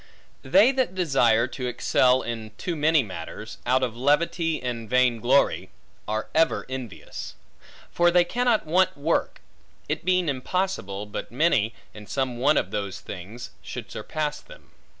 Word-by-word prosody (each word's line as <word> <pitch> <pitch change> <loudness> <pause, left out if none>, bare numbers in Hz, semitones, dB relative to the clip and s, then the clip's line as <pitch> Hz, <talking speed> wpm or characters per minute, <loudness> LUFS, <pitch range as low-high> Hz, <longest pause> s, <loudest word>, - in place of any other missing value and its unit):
They 195 - +5
that 260 -8 -1
desire 125 -10 +3
to 125 -1 -4
excel 125 +1 +3
in 115 -2 -5
too 175 - -3
many 155 -1 +3
matters, 105 +2 -8
out 130 +1 +3
of 120 -3 -1
levity 160 +5 +1
and 120 -3 -4
vain 125 -2 +3
glory, 130 +5 +2 0.4
are 110 +1 -2
ever 160 +1 +2
envious. 130 -6 -7 0.6
For 175 0 +4
they 175 0 +5
cannot 240 +3 +1
want 185 +2 +2
work; 155 +4 -1 0.5
it - - -2
being 185 -1 +2
impossible, 130 - -2
but 105 - -6
many, 125 -5 +2 0.2
in 105 -1 -11
some 130 -3 -2
one 145 +3 +4
of - - 0
those 100 -2 -3
things, 100 +6 -8
should - - -8
surpass 150 -1 -3
them. - - -16
130 Hz, 150 wpm, -25 LUFS, 115-170 Hz, 0.6 s, They